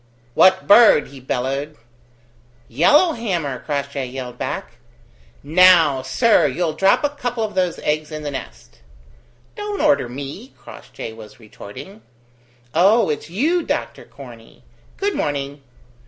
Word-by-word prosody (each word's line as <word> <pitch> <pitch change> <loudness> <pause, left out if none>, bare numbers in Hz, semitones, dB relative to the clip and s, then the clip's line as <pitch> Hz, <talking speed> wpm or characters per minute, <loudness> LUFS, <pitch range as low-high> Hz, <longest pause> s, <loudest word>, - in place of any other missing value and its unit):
"What 190 +6 +4
bird?" 205 -7 +6
he 140 - -12
bellowed. 135 +4 -4 0.9
"Yellowhammer," 180 - +1
Crossjay 140 -2 -4
yelled 125 -1 -8
back. - - -5 0.7
"Now, 165 -3 +5
sir, 130 - +2
you'll 160 +3 -2
drop 195 - +2
a 290 - +2
couple 245 -5 -4
of 215 - -4
those 180 -2 -1
eggs 155 +1 -2
in 155 0 -6
the 145 - -4
nest." 135 - -10 0.8
"Don't 415 -2 -5
order 290 - +2
me," 140 - -8
Crossjay 110 - -10
was 110 0 -14
retorting. 130 - -12 0.7
"Oh, 200 0 +3
it's 150 +1 -5
you, 305 - 0
Doctor - - -4
Corney. - - -15 0.3
Good 405 0 -1
morning. 140 0 -3
155 Hz, 125 wpm, -20 LUFS, 135-220 Hz, 0.9 s, bird